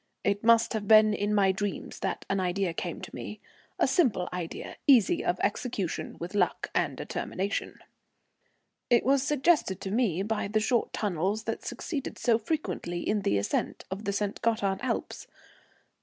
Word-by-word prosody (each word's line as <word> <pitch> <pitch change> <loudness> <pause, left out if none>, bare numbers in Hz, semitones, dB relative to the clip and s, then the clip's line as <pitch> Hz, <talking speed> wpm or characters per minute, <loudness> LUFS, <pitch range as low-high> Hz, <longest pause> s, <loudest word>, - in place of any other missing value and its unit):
It 200 0 0
must 230 0 +5
have 210 -2 -3
been 215 0 +7
in 205 0 -1
my 200 -2 +4
dreams 205 +1 -4
that - - -3
an 195 - 0
idea 185 -1 0
came - - -4
to - - -9
me, - - -7 0.4
a - - +3
simple 240 - +2
idea, 175 -2 -5
easy 275 - +5
of - - 0
execution 210 - -2
with 175 +3 -6
luck 190 -4 0
and - - 0
determination. 195 +2 -3 1.1
It 240 - +4
was 270 +1 +4
suggested 280 - +2
to 190 - -4
me 200 -6 +1
by 215 0 -1
the 215 +2 +1
short 225 +2 +1
tunnels 200 +2 -1
that 225 - -4
succeed 285 -6 -4
so 235 -2 +2
frequently 215 - -3
in 210 0 +1
the 100 - +1
ascent 100 - -2
of 200 +3 -5
the 200 - 0
St. 200 0 -2
Gothard 210 -4 +1
Alps. - - -3
205 Hz, 165 wpm, -28 LUFS, 190-230 Hz, 1.1 s, been